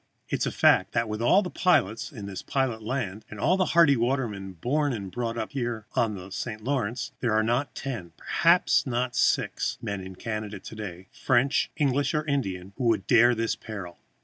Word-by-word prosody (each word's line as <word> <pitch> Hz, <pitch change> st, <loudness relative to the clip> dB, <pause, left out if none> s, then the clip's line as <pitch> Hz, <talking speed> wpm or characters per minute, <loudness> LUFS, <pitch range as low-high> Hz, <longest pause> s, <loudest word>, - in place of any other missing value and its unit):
It -, -, -1 dB
is -, -, +1 dB
a -, -, -1 dB
fact -, -, +4 dB
that 115 Hz, -, +1 dB
with 105 Hz, +1 st, -4 dB
all 185 Hz, -, +5 dB
the 180 Hz, -, -5 dB
pilots 115 Hz, -, +1 dB
in 110 Hz, -8 st, -8 dB
this 95 Hz, -2 st, -6 dB
pilot 130 Hz, -5 st, -1 dB
land, 110 Hz, -3 st, -3 dB
and 105 Hz, -, -9 dB
all 175 Hz, -, +3 dB
the 190 Hz, -1 st, +2 dB
hardy 155 Hz, -5 st, +7 dB
watermen 115 Hz, -6 st, -1 dB
born 140 Hz, -, 0 dB
and 100 Hz, -5 st, -5 dB
brought 115 Hz, +3 st, -3 dB
up 110 Hz, -, -3 dB, 0.4 s
on 110 Hz, -3 st, +1 dB
the 95 Hz, 0 st, -9 dB
St. 110 Hz, +1 st, -5 dB
Lawrence, 125 Hz, -3 st, -2 dB
there 120 Hz, -3 st, 0 dB
are 110 Hz, -, +3 dB
not 120 Hz, +5 st, 0 dB
ten 110 Hz, -11 st, -5 dB
perhaps 170 Hz, -, +3 dB
not 125 Hz, 0 st, -1 dB
six -, -, +1 dB
men 100 Hz, -3 st, -4 dB
in 95 Hz, 0 st, -9 dB
Canada 105 Hz, 0 st, -5 dB
to 110 Hz, -, -10 dB
day, 95 Hz, -3 st, -7 dB
French 130 Hz, +2 st, +2 dB
or -, -, -36 dB
English 140 Hz, +1 st, +1 dB
or 150 Hz, 0 st, 0 dB
Indian, 100 Hz, -, -2 dB
who 130 Hz, -, -2 dB
would 110 Hz, -4 st, +2 dB
dare 120 Hz, 0 st, +5 dB
this 115 Hz, 0 st, 0 dB
peril. 100 Hz, -6 st, -8 dB
115 Hz, 200 wpm, -27 LUFS, 100-135 Hz, 0.4 s, hardy